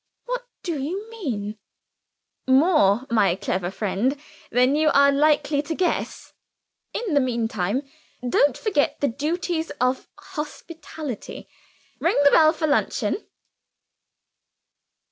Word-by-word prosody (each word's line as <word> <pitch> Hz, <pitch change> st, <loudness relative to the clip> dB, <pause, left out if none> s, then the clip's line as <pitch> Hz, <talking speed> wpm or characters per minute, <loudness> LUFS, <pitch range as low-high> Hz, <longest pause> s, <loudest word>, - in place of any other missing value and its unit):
"What -, -, -2 dB, 0.2 s
do 325 Hz, -6 st, -3 dB
you 375 Hz, +10 st, -4 dB
mean?" 220 Hz, -, -4 dB, 0.9 s
"More, 260 Hz, -, +4 dB
my 200 Hz, -6 st, +3 dB
clever 185 Hz, -1 st, -2 dB
friend, 220 Hz, +8 st, -1 dB, 0.3 s
than 250 Hz, +3 st, +3 dB
you 310 Hz, 0 st, +3 dB
are 280 Hz, 0 st, +6 dB
likely 290 Hz, 0 st, +2 dB
to 320 Hz, +2 st, -4 dB
guess. 360 Hz, +1 st, -2 dB, 0.6 s
In 440 Hz, -8 st, -3 dB
the 285 Hz, -, +5 dB
meantime, 230 Hz, -2 st, -1 dB, 0.4 s
don't 275 Hz, +2 st, +3 dB
forget 345 Hz, -10 st, 0 dB
the 285 Hz, -, +2 dB
duties 320 Hz, +5 st, -2 dB
of 255 Hz, +1 st, 0 dB
hospitality. 315 Hz, -, -7 dB, 0.5 s
Ring -, -, +1 dB
the 285 Hz, -, +6 dB
bell 310 Hz, -1 st, +6 dB
for 315 Hz, -1 st, -2 dB
luncheon." 310 Hz, +7 st, 0 dB
285 Hz, 110 wpm, -23 LUFS, 240-320 Hz, 0.9 s, are